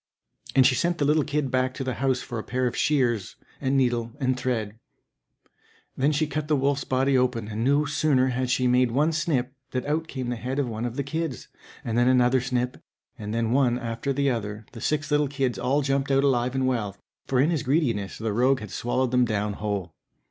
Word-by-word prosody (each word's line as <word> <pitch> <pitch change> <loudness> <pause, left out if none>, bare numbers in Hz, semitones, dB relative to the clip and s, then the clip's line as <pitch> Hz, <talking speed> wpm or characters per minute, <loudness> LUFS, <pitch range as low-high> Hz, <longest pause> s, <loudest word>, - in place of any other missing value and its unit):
And 130 - +6
she 130 - +5
sent 170 +5 0
the 145 - +1
little 150 +1 +3
kid 145 -2 -1
back 130 0 0
to 135 - -4
the 130 -1 -2
house 130 -2 +1
for 120 -3 -5
a - - -5
pair 125 +1 -1
of 125 - -1
shears, 120 -10 +1 0.3
and 135 0 +1
needle, 120 -3 +1
and 130 -2 +1
thread. 115 -4 -3 1.2
Then 140 +3 +2
she 155 +1 +1
cut 150 0 -3
the 150 - +3
wolf's 140 0 +1
body 130 +1 +1
open, 125 -4 +1
and 110 +1 -3
no 145 +3 +3
sooner 145 -3 +2
had 125 0 -1
she 125 0 +1
made 125 0 +3
one 145 +7 +2
snip 145 -5 -1 0.2
than 125 -1 -3
out 155 +3 -1
came 130 -5 -4
the 120 - -2
head 125 +4 -4
of 140 -3 +1
one 115 0 -4
of 120 -1 -4
the 140 - -1
kids, 160 -1 -4 0.4
and 115 0 0
then 120 - +4
another 125 0 +4
snip, 125 -1 -2 0.4
and 105 0 -5
then 115 0 0
one 125 -2 +3
after 115 +2 -3
the 140 0 +1
other 105 -2 -4
the 115 - -10
six 150 0 -1
little 150 0 +3
kids 135 -3 -1
all 135 +4 +1
jumped 135 0 0
out 135 0 +3
alive 130 -2 +1
and 130 -1 +1
well, 110 -6 -1 0.3
for 130 - +1
in 150 +6 +3
his 160 -5 0
greediness 125 - 0
the 110 -1 -2
rogue 130 +4 +3
had 110 -2 -8
swallowed 125 +1 -1
them 125 0 +4
down 105 -2 -1
whole. 100 -5 -3
130 Hz, 220 wpm, -25 LUFS, 120-140 Hz, 1.2 s, And